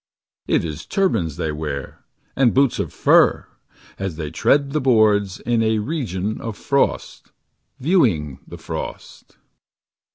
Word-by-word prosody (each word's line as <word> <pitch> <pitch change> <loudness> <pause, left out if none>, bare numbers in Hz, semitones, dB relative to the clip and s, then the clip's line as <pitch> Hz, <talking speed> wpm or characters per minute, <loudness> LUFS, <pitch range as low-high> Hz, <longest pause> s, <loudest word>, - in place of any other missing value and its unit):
It - - +1
is 75 -1 -6
turbans 110 - 0
they 80 - -2
wear 75 -2 -6 0.3
And 130 -3 +3
boots 135 -2 +3
of - - -2
fur - - +3 0.5
As 95 -4 -3
they 75 -2 -5
tread 140 - +2
the 155 +1 0
boards 105 -6 +3
In 120 0 0
a 110 0 +2
region 105 - -3
of 115 -2 -5
frost,. 140 0 -1 0.5
Viewing 110 - +1
the - - -9
frost. - - -8
110 Hz, 130 wpm, -21 LUFS, 80-135 Hz, 0.5 s, And